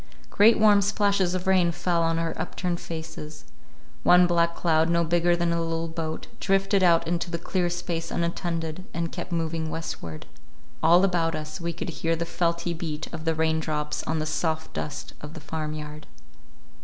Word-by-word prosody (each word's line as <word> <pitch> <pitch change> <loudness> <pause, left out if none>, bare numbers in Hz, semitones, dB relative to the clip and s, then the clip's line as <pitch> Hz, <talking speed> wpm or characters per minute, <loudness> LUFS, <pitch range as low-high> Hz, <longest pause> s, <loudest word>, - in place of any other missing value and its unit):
Great 225 +3 +6
warm 210 -2 +6
splashes 200 -2 +1
of 185 +1 -3
rain 185 -2 +4
fell 170 0 0
on 165 0 +1
our 165 0 -1
upturned 175 -2 -3
faces. 160 -2 -7 0.6
One 180 0 +6
black 170 -1 +2
cloud, 160 -1 +2
no 170 0 +3
bigger 175 +1 +2
than 170 -1 0
a 170 - 0
little 165 0 -2
boat, 160 -1 -4
drifted 195 0 +2
out 170 -3 +4
into 175 +1 -1
the 170 - -2
clear 180 +1 -1
space 170 -1 -3
unattended, 170 0 -2
and 170 0 -2
kept 180 0 -6
moving 165 -1 -1
westward. 85 - -6 0.6
All 175 +3 +6
about 170 -4 +1
us 155 +3 -6
we 170 0 -1
could 170 +1 -5
hear 165 0 +2
the 170 +1 -2
felty 170 0 -1
beat 160 -2 -5
of 160 -1 -6
the 165 0 +1
raindrops 160 -1 0
on 160 - -1
the 155 - -1
soft 160 0 -2
dust 150 - -5
of 150 +2 -9
the - - -7
farmyard. 155 -1 -5
170 Hz, 175 wpm, -26 LUFS, 160-175 Hz, 0.6 s, Great